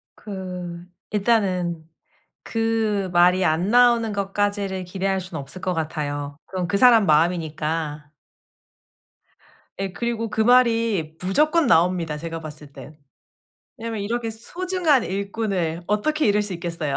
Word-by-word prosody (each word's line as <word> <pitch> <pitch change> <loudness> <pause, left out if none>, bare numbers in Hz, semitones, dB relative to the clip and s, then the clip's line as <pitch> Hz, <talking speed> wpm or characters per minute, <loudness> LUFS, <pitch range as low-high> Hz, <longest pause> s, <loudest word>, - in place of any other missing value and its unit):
그 180 -4 -7 0.3
일단은 185 -7 0 0.5
그 225 -3 0
말이 180 +2 +4
안 165 +3 +1
나오는 235 -2 +4
것까지를 200 -1 -1
기대할 190 +1 -1
수는 180 -4 -6
없을 140 +7 -10
것 185 0 -1
같아요. 145 -3 -3
그건 185 -2 -3
그 200 - +1
사람 230 -2 +6
마음이니까. 155 -2 0 1.7
예. 195 -1 -3
그리고 230 +2 -2
그 215 - -2
말이 230 -8 +3
무조건 300 - +2
나옵니다 170 -6 +2
제가 165 +1 -6
봤을 150 -2 -10
땐. 150 +2 -12 0.8
왜냐하면 225 -1 -4
이렇게 225 +3 -2
소중한 330 +4 0
일꾼을 195 -4 -2
어떻게 300 +10 +1
잃을 210 0 +3
수 205 -2 -4
있겠어요. 170 -4 -3
190 Hz, 275 characters per minute, -23 LUFS, 165-225 Hz, 1.7 s, 사람